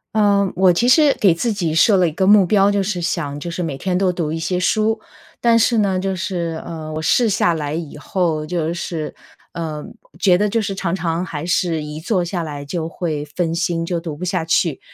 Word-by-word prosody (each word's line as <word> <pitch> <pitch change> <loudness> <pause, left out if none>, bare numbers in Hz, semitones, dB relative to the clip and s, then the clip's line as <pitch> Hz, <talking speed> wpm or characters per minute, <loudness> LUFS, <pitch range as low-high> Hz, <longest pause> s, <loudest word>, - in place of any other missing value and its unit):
呃， 200 -2 +3
我 185 -1 +5
其 235 +8 +1
实 290 +2 +5
给 195 -5 +5
自 230 +8 -1
己 175 -7 -1
设 195 +4 +5
了 180 - +3
一 - - -2
个 190 +4 0
目 200 -1 +6
标， 200 +2 +3
就 205 0 +1
是 190 -2 -2
想 160 -4 -2
就 170 +4 -5
是 175 - -4
每 150 -5 -3
天 180 +2 -1
都 185 -1 +1
读 165 -3 -2
一 165 - -3
些 180 +3 -1
书， 215 +4 +1 0.4
但 230 -1 +4
是 230 0 +3
呢 195 -3 +1
就 190 0 -2
是， 170 -3 -3
呃， 160 -2 -6
我 155 - -3
试 235 +9 +3
下 180 -3 +2
来 150 -2 -3
以 160 -2 -5
后 155 0 -1
就 165 0 -2
是， 165 -2 -4 0.4
呃， 155 -3 -5 0.3
觉 180 -3 +4
得 210 +3 +1
就 225 +2 0
是 200 -2 -3
常 190 -2 -2
常 170 -1 -2
还 155 -3 -5
是 170 -3 0
一 150 +1 -6
坐 180 +2 0
下 175 0 -3
来 145 -3 -6
就 160 +3 -4
会 160 -3 -3
分 165 +3 -2
心， 170 -1 -1
就 175 0 -2
读 165 -3 -6
不 155 - -8
下 180 -2 -1
去。 165 -2 +1
175 Hz, 245 characters per minute, -19 LUFS, 160-195 Hz, 0.4 s, 目